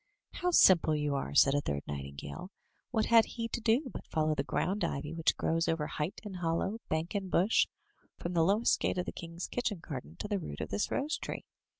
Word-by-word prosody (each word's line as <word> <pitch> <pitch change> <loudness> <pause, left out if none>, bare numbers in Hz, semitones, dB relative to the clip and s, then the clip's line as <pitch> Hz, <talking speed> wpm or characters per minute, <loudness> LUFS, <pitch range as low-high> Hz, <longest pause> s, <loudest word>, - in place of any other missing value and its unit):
*' - - -61
"How 360 - +2
simple 175 - +6
you 150 -1 0
are!'* 105 - -3
said 135 - +6
a 145 - +2
third 70 - -3
nightingale. 70 - -6 0.4
"What 220 -3 +1
had 230 -1 +7
he 230 -1 -4
to 235 - -3
do 235 +6 +2
but - - -8
follow 155 -1 +1
the - - 0
ground 200 +3 -1
ivy 150 +3 -2
which 165 -1 +1
grows 165 +1 +1
over 165 -2 0
height 150 +4 -3
and 200 -4 -6
hollow, 175 +5 -1
bank 160 +2 -1
and 195 -2 -2
bush, 190 +6 +3 0.5
from 175 - -4
the 165 -1 +4
lowest 205 +7 +3
gate - - 0
of 180 - 0
the - - -4
king's 170 +1 -6
kitchen 230 -5 -2
garden 130 - -7
to - - -5
the 205 -1 0
root 75 - -7
of - - -4
this 100 - -1
rose 295 +5 -1
tree? - - -5
170 Hz, 225 wpm, -32 LUFS, 150-210 Hz, 0.5 s, had